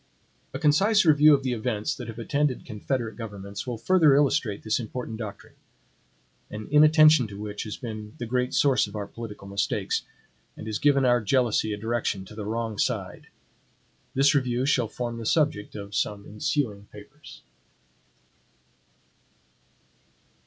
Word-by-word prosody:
A - - -4
concise 200 +8 +3
review 155 -1 +6
of 135 - -4
the 130 -2 -1
events 110 -2 -2
that 125 - -8
have 115 -1 -8
attended 140 +3 -1
confederate 115 0 -3
governments 100 -1 -7
will 120 -2 -3
further 160 0 +4
illustrate 140 -7 +1
this 110 +2 0
important 115 0 -5
doctrine; 105 -3 -8 1.0
an 105 0 -7
inattention 155 -3 +6
to 100 -1 -10
which 105 0 -5
has 105 - -6
been 110 -3 -7
the 120 - -4
great 125 +2 -1
source 135 -6 +3
of - - -11
our 105 -1 -3
political 105 -2 -9
mistakes, 100 0 -1 0.6
and - - -8
has 110 -1 -3
given 140 -2 +3
our 120 -1 +3
jealousy 110 -1 +1
a 105 - -3
direction 110 -3 -2
to 100 - -13
the 105 -1 -6
wrong 110 -1 -3
side. - - -2 0.9
This 140 +2 +4
review 130 -2 0
shall 125 -4 +2
form 120 +1 -5
the - - -6
subject 145 -10 0
of 100 -1 -8
some 100 +1 -2
ensuing 105 -1 -2
papers. 135 +9 -14
115 Hz, 150 wpm, -26 LUFS, 105-135 Hz, 1.0 s, review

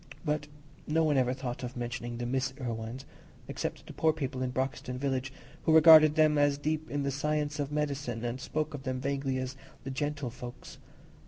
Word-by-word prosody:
But 150 -1 -1 0.4
no 160 +2 +2
one 150 -2 +3
ever 125 -2 +3
thought 130 -2 -4
of 125 0 -6
mentioning 120 0 -4
the 120 - -3
Miss 130 +2 -1
Irwines, 120 +1 -4 0.4
except - - -4
the - - -9
poor 160 - +3
people 135 -4 -3
in 130 - 0
Broxton 130 -1 -3
village, 135 0 -1 0.3
who 160 - +5
regarded 155 -1 +9
them 155 -2 +4
as 145 -1 +3
deep 155 +2 -2
in 145 0 -1
the 140 - 0
science 150 +1 -1
of 145 0 -2
medicine, 140 -6 -2
and 120 +2 -3
spoke 155 +2 -2
of 145 - -5
them 130 -1 -3
vaguely 135 0 -1
as 130 +1 -3 0.3
"the 135 - -4
gentlefolks." 130 -4 -5
135 Hz, 185 wpm, -30 LUFS, 125-150 Hz, 0.4 s, regarded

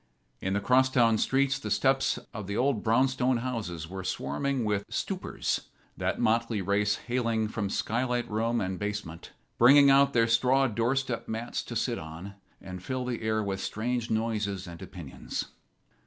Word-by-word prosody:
In 95 - -2
the 100 - +1
cross 130 +5 +4
town 115 -4 +3
streets 135 0 +2
the - - -5
steps 135 0 +2 0.2
of 100 -2 -6
the 100 - -3
old 125 -4 +1
brownstone 130 +2 +2
houses 110 -10 -4
were 95 +2 -6
swarming 110 - -2
with 105 -1 0
"stoopers," - - -2 0.3
that - - -1
motley 115 0 +1
race 100 +2 +1
hailing 115 -3 0
from 105 -2 -3
sky 115 +5 -1
light 125 -2 -1
room 115 +2 0
and 95 -1 -3
basement, 105 -5 -5 0.3
bringing 140 +3 +8
out 140 0 +5
their 115 -1 +4
straw 125 +4 +3
door 115 +2 0
step 130 -3 -2
mats 115 +2 -3
to - - -8
sit - - -1
and 90 +3 -10
fill 130 +6 -3
the 125 -2 -3
air 110 -1 0
with 95 -1 -3
strange 120 +1 -2
noises 105 -4 -1
and 85 -2 -10
opinions. 80 -7 -6
115 Hz, 165 wpm, -28 LUFS, 100-125 Hz, 0.3 s, bringing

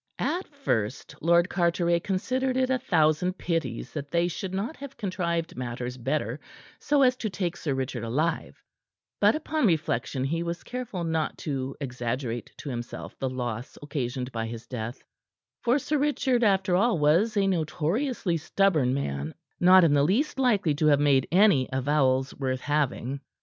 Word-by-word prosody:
At 365 +2 -1
first 130 - -2
Lord 170 +2 +4
Carteret 170 -1 +1
considered 255 +7 -1
it 260 0 +2
a 260 - +2
thousand 175 -2 +2
pities 140 -10 -3
that 145 -2 -5
they 170 +2 +2
should 180 +2 -4
not 200 +11 -3
have 275 -1 -9
contrived 170 -5 -2
matters 125 0 -4
better 130 0 -2 0.4
so 290 -2 +3
as 255 -1 +4
to 220 - -2
take 180 -3 -2
Sir 145 -4 -2
Richard 130 -3 -3
alive; 155 +8 -1 0.6
but - - +5
upon 310 -4 0
reflection 145 -6 0
he 165 +5 -1
was 170 0 -4
careful 245 -8 -5
not 160 -1 -1
to 135 -2 -3
exaggerate 125 -2 -3
to 145 - -7
himself 120 -1 -6
the 135 - -1
loss 120 -2 -4
occasioned 130 -3 -3
by 115 -1 -3
his 115 0 -7
death, 120 -1 -6 0.6
for 245 +3 +3
Sir 295 +1 -1
Richard, 270 -4 +1
after 190 -3 +3
all, 225 +1 +3
was 170 +10 +3
a 200 - +3
notoriously 180 - 0
stubborn 155 -6 +2
man, 70 - -3 0.2
not 185 +1 +7
in 160 -3 +4
the 145 - +4
least 230 - +1
likely 210 - +3
to 155 +2 +1
have 145 -2 +5
made 140 -3 +3
any 180 -8 +4
avowals 130 0 +1
worth 130 -2 -2
having. 140 -2 -1
160 Hz, 160 wpm, -27 LUFS, 130-195 Hz, 0.6 s, not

